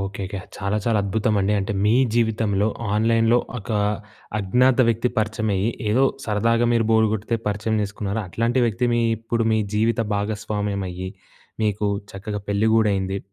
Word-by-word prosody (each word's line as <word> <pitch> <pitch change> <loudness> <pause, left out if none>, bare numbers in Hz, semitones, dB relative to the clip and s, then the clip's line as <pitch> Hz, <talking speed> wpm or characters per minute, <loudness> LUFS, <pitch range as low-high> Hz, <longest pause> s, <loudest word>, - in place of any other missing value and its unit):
ఓకేకే. 95 0 -4 0.2
చాలా 100 +1 -1
చాలా 115 -3 +2
అద్భుతమండి. 105 0 +1
అంటే, 105 +3 -2
మీ 105 - +4 0.2
జీవితంలో, 110 -3 +1 0.3
ఆన్‍లైన్‍లో 115 +2 +3 0.2
ఒకా 105 +1 -2 0.6
అజ్ఞాత 125 +6 +3
వ్యక్తి 115 +2 +1
పరిచయమయ్యి, 110 -1 0 0.2
ఏదో 130 +5 +4 0.2
సరదాగా 115 +2 +2
మీరు 115 -1 +2
బోరు 110 -1 +4
గొడితే 110 +2 -1
పరిచయం 105 +2 -1
చేసుకున్నారు. 105 +1 -3
అట్లాంటి 115 +7 0
వ్యక్తి 115 +2 0
మీ 120 - +2 0.2
ఇప్పుడు 115 +1 -1
మీ 110 - +3 0.2
జీవిత 115 +2 +2
భాగస్వామ్యమయ్యి. 100 -3 -3 0.5
మీకు 105 -1 0 0.2
చక్కగా 105 +1 -5
పెళ్లి 100 +2 +2
గూడయింది. 100 -3 +1
105 Hz, 135 wpm, -22 LUFS, 100-115 Hz, 0.6 s, మీ